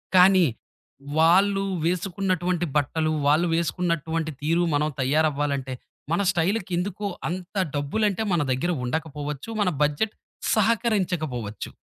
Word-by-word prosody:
కానీ, 185 -1 +7 0.7
వాళ్ళు 195 +4 +4 0.2
వేసుకున్నటువంటి 180 -1 0
బట్టలు, 155 +2 +1 0.2
వాళ్ళు 155 +4 +4
వేసుకున్నటువంటి 165 -2 -1
తీరు 165 +4 +2
మనం 150 +1 +1
తయారవ్వాలంటే 140 -1 0 0.4
మన 170 +4 +2
స్టైల్‌కి 190 +2 0
ఎందుకో 200 +3 -2 0.2
అంత 180 +3 -6 0.2
డబ్బులంటే 200 +9 0
మన 170 - +2
దగ్గర 130 +8 0
ఉండకపోవచ్చు. 150 - -4
మన 190 - +3
బడ్జెట్ 150 +9 0 0.4
సహకరించకపోవచ్చు. 180 - 0
170 Hz, 100 wpm, -25 LUFS, 150-190 Hz, 0.7 s, కానీ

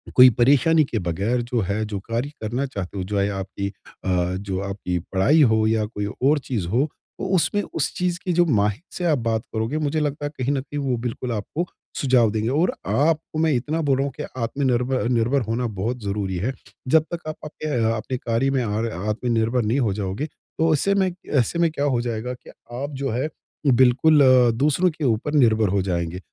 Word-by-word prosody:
कोई 125 0 +10
परेशानी 150 +6 +5
के 115 -5 -2
बगैर 100 +8 -1
जो 120 0 -2
हैं 100 +3 -1
जो 100 -2 -4
कार्य 115 +7 -3
करना 120 +5 -1
चाहते 100 -6 -6
हो, 95 - -2
जो 100 +2 -3 0.2
आपकी 100 +1 -4
अ, 90 -2 -3
जो 95 -1 -3
आपकी 90 -3 -3 0.2
पढ़ाई 140 +12 +4
हो 110 -5 +4
या 110 -1 +1
कोई 105 -2 -4
और 135 +8 +1
चीज़ 115 -10 -3
हो 120 - +2 0.3
तो - - -2
उसमें 205 +4 +2
उस 160 - -1
चीज़ 180 -1 0
की 180 - +1
जो 175 +1 +4
माहिर 105 -4 +1
से 180 - -2
आप 155 -4 +3
बात 115 -2 -1
करोगे, 115 +6 -1
मुझे 155 0 0
लगता 145 0 -2
हैं 145 - -3
कहीं 130 +1 0
न 135 - -1
कहीं 145 +1 -6
वो 130 -4 0
बिल्कुल 120 +1 -4
आपको 115 - -3 0.3
सुझाव 125 -5 +3
देंगे। 110 +2 -1
और 165 - +2
आपको 155 +1 +1
मैं 160 -1 +3
इतना 150 +6 -1
बोल 140 -4 +2
रहा 135 - +1
हूँ 140 - -3
कि - - -4 0.2
आत्मनिर्भ 125 +1 0 0.2
निर्भर 120 +4 +2
होना 115 +2 -1
बहुत 120 +4 -2
ज़रूरी 100 -2 -2
हैं। 115 +9 -1 0.3
जब 160 +3 +4
तक 170 -2 -5
आप 155 - -3
आपके 150 -4 -3
आपके 115 +3 -3
कार्य 120 +3 0
में 135 -2 +1
आर 110 +1 -1
आत्मनिर्भर 115 +4 0
नहीं 115 +6 +1
हो 115 -7 +1
जाओगे। 100 +6 -3
तो 160 +1 -2
ऐसे 195 +7 +2
में 190 -2 +2 0.2
ऐसे 145 +4 +1
में 170 -1 +4
क्या 145 -2 -1
हो 125 -4 +1
जाएगा 120 +1 -3
कि 125 - -14 0.3
आप 140 +3 -3
जो 135 - 0
हैं 130 +6 -1 0.5
बिल्कुल 130 +5 +5
अ, 125 -2 +6
दूसरों 150 +9 +2
के 155 0 -7
ऊपर 120 +5 0
निर्भर 110 -7 +4
हो 100 0 +1
जाएँगे। 85 -1 -2
125 Hz, 205 wpm, -23 LUFS, 110-145 Hz, 0.5 s, कोई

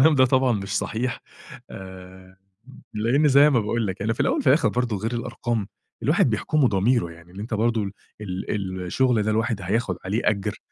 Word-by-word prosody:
ده 130 -1 +6
طبعًا 130 0 +3
مش 100 -2 -2
صحيح. 120 +3 -2 0.5
آآ، 95 0 -11 0.6
لإن 120 +8 +2
زي 140 +2 +6
ما 125 -5 +3
باقول 110 0 -1
لك 95 +1 -4
يعني، 110 +3 0
في - - -16
الأوَّل - - +2
وفي - - -3
الآخِر 130 -3 +4
برضه، 120 -1 -1
غير 115 +5 -3
الأرقام 115 -2 -3 0.4
الواحد - - +3
بيحكُمه 150 -4 +1
ضميره، 105 -2 +1
يعني 85 +1 -16
إن 95 - -11
أنتَ 110 +2 -5
برضه 115 0 +1
ال 100 0 -5 0.6
ال 95 -3 -3
الشغل 120 +2 +2
ده 110 - 0
الواحد 110 -1 0
هياخُد 95 0 -1
عليه 105 +5 -1
أجر، 100 -2 0
110 Hz, 185 wpm, -24 LUFS, 95-120 Hz, 0.6 s, ده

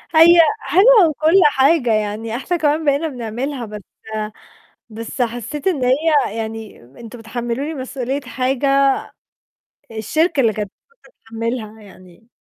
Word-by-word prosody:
هي 340 +2 +7 0.2
حلوة 420 -3 +5
وكلّ 315 +5 +3
حاجة، 275 -2 +3
يعني 215 +1 -2
إحنا 310 +8 -2
كمان 310 0 0
بقينا 285 +3 +1
بنعملها، 250 0 -5
بس 210 -1 -9 1.1
بس 230 +3 -6
حسيت 245 - -3
إن 310 -9 0
هي 280 -3 +2
يعني 225 -1 -6
أنتم 225 - -13
بتحملوني 240 +6 -4
مسؤولية 265 0 -4
حاجة 275 +1 +1 1.0
الشركة 285 - -1
اللي 225 -3 +2
كانت 210 -1 -4 0.4
مفروض - - -22
تتحملها، 225 -1 -5
يعني 185 +1 -17
255 Hz, 120 wpm, -19 LUFS, 225-295 Hz, 1.1 s, هي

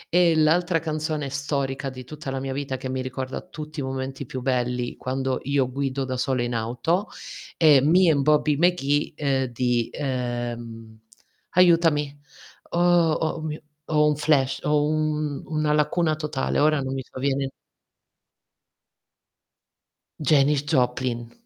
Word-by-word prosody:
e 170 -2 +5
l'altra 165 +3 +3
canzone 155 -2 -2
storica 140 -1 -2
di 130 -1 -9
tutta 145 +1 -8
la 135 0 -2
mia 135 0 -4
vita, 135 -1 -3
che 130 - -6
mi 130 0 -2
ricorda 130 0 -5
tutti 155 -1 -9
i - - -2
momenti 130 0 -4
più 130 - -5
belli, 125 -1 -1
quando 130 0 -2
io 140 -2 +1
guido 135 0 -2
da 130 -1 -3
sola 125 -1 0
in 120 0 -3
auto, 125 - -1 0.5
è 150 -4 +6
Me 170 +4 +5
and 140 -2 +2
Bobby 150 0 +3
McGee, 150 -4 +1
uhm, 135 -2 +1
di 120 -1 0
ehm, 120 -4 -4 0.6
aiutami. 165 -5 +4 0.5
Oh, 175 -1 +3
o 160 0 -2
mio 155 -1 -4 0.3
ho 150 -1 +3
un 150 - +2
flash. 140 -3 +1
Ho 150 0 +2
un 155 -1 -1
una 155 -1 0
lacuna 155 +1 +1
totale, 150 -4 -2
ora 155 0 +3
non 130 0 -3
mi 135 - -3
sovviene. 135 +1 -2 2.7
Janis 145 -1 +3
Joplin. 125 -4 0
140 Hz, 140 wpm, -24 LUFS, 130-155 Hz, 2.7 s, è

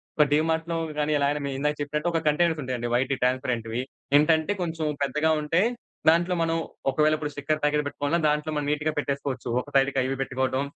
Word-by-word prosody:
ఒక 150 - +5
డీమార్ట్‌లో 160 +2 +1 0.2
గానీ, 150 0 0
ఎలాగైనా 145 +1 +1
మీరు 135 -1 -3
ఇందాక 150 +1 0
చెప్పినట్టు 150 +4 -1
ఒక 165 - +1
కంటైనర్స్ 160 +1 +2
ఉంటాయండి 125 -2 -3
వైట్ 130 +3 +1
ట్రాన్స్పరెంట్‌వి. 125 -2 0 0.4
ఏంటంటే, 160 +4 +3
కొంచెం 165 -2 -2 0.2
పెద్దగా 150 +4 +1
ఉంటాయి. 165 +8 +2 0.4
దాంట్లో 175 +2 +3
మనం 165 0 +1 0.3
ఒకవేళ 155 +3 +3
ఇప్పుడు 150 -1 -4
స్టిక్కర్ 150 +2 -1
ప్యాకెట్ 150 0 +2
పెట్టుకోవాలన్నా, 145 +4 -1
దాంట్లో 150 +1 -1
మనం 145 -1 -1
నీట్‌గా 150 +1 0
పెట్టేసుకోవచ్చు. 140 -3 -2
ఒక - - -13
సైడ్‌కి 135 0 +3
అవి 130 +1 -1
పెట్టుకోవటం, 130 +1 -1
150 Hz, 175 wpm, -26 LUFS, 135-160 Hz, 0.4 s, ఒక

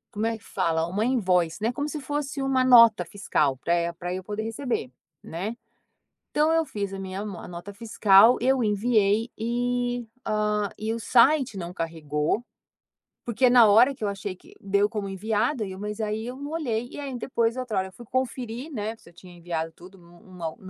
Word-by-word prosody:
Uma 205 -4 -1
invoice, 185 -8 +1
né, 225 +3 +1
como 290 +4 -3
se 300 - -5
fosse 285 0 -3
uma 270 -1 +2
nota 230 -3 +7
fiscal 150 -9 0
pra 170 +6 -1
e 170 0 -1
pra 175 +1 -5
eu 185 0 -5
poder 210 +2 -4
receber, 225 - -3 0.3
né. 190 +8 -5 0.8
Então 305 +2 +2
eu 325 0 +3
fiz 200 -8 -4
a 195 - -6
minha 190 0 -5
a 205 -4 -7
nota 175 +3 -8
fiscal, 215 0 +5
eu 260 0 +2
enviei 215 +1 +2
e, 245 +1 -1 0.2
ah, 210 -1 0
e 220 +1 -2
o 230 - -4
site 255 0 +4
não 175 -1 -5
carregou, 160 +3 -2 0.8
porque 240 +2 +2
na 245 -2 +7
hora 240 +7 +6
que 250 - -17
eu 210 - +1
achei 200 -1 -4
que - - -19
deu 200 +1 +2
como 210 -3 -4
enviada 215 +5 -1
e 190 - -6
eu 185 - -9
mas 210 +2 -5
aí 215 +1 -2
eu 250 - -6
não 285 +2 -7
olhei, 245 -8 -2
e - - -9
aí 275 -3 -5
depois 235 -1 0
outra 245 -6 -2
hora 190 0 -1
eu - - -17
fui 240 +4 -13
conferir, 255 +2 -3
né, 220 -2 -4
se 170 - -19
eu - - -26
tinha 180 +1 -14
enviado 165 -1 -4
tudo 180 +4 -15
em - - -19
um 170 -1 -9
215 Hz, 190 wpm, -26 LUFS, 190-245 Hz, 0.8 s, nota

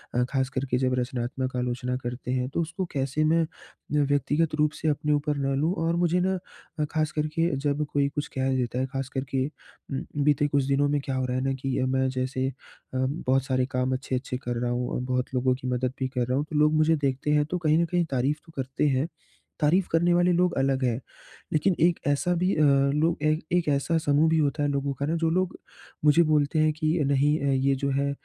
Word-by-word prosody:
अ, 125 - +3
ख़ास 130 -1 0
कर 135 0 -2
के 125 - +3
जब 130 0 +1
रचनात्मक 130 +1 -3
आलोचना 125 +1 -2
करते 120 +1 -4
हैं 130 0 -1
तो 160 - -1
उसको 175 +3 -3
कैसे 135 +2 0
मैं 165 +2 +3
अ, - - -4 0.5
व्यक्तिगत 145 +3 +1
रूप 150 0 +2
से 160 - -1
अपने 150 0 +1
ऊपर 145 0 0
ना 135 0 0
लूँ 155 +6 +1
और 165 +1 +1
मुझे 175 +1 +2
ना 190 +1 +1 0.5
अ, 150 - +2
ख़ास 155 0 0
कर 155 -2 -1
के 165 +1 +3
जब 145 +2 -1
कोई 140 -1 +2
कुछ 145 0 -4
कह 130 0 +1
देता 125 -1 -1
है 130 - +1
ख़ास 135 -1 -4
कर 130 - -1
के 130 0 +1
उम, 140 -2 -9 0.2
बीते 145 0 +3
कुछ 140 -1 +1
दिनों 140 +1 +2
में 145 0 +1
क्या 135 - -2
हो 130 - 0
रहा 125 0 -1
है 130 - -1
ना 135 0 0
कि 135 -1 -1
मैं 130 0 +1
जैसे 130 0 -2
अ, - - -9 0.4
बहुत 130 0 0
सारे 130 -1 +1
काम 130 0 0
अच्छे-अच्छे 130 0 -3
कर 120 0 -2
रहा 120 0 0
हूँ 125 0 -1
और - - -1
बहुत 125 +1 -1
लोगों 130 0 +2
की 130 0 -7
मदद 125 0 -1
भी 130 - 0
कर 125 -2 -1
रहा 125 +1 0
हूँ। 145 - 0
तो 155 - -5
लोग 150 +1 +4
मुझे 155 +1 +4
देखते 140 0 -1
हैं, 150 0 +3
तो 180 +4 -3
कहीं 155 -3 +2
न - - +2
कहीं 175 0 0
तारीफ़ 135 +3 +1
तो 165 - -15
करते 135 +2 -1
हैं। 135 +2 +1 0.5
तारीफ़ 170 +4 +3
करने 170 +2 +3
वाले 175 +1 +3
लोग 180 0 +2
अलग 135 0 +1
हैं। 120 -2 +1 0.5
लेकिन 175 +4 +2
एक 170 0 +3
ऐसा 145 +5 +1
भी 180 +3 +1
अ, 155 - +1 0.3
लोग 160 0 +1
एक 155 +1 +1
एक 175 -2 +2
ऐसा 145 +4 +1
समूह 155 0 +3
भी 160 - +2
होता 145 0 +1
है 145 - +1
लोगों 140 0 -1
का 140 - 0
ना 160 +3 0
जो 165 - +3
लोग 185 +2 0 0.5
मुझे 150 +3 +6
बोलते 150 +1 +2
हैं 155 0 +4
कि 155 +2 0
नहीं 140 +1 +3 0.3
ये 140 0 +3
जो 140 +1 -2
है 140 0 +1
140 Hz, 240 wpm, -26 LUFS, 130-155 Hz, 0.5 s, मुझे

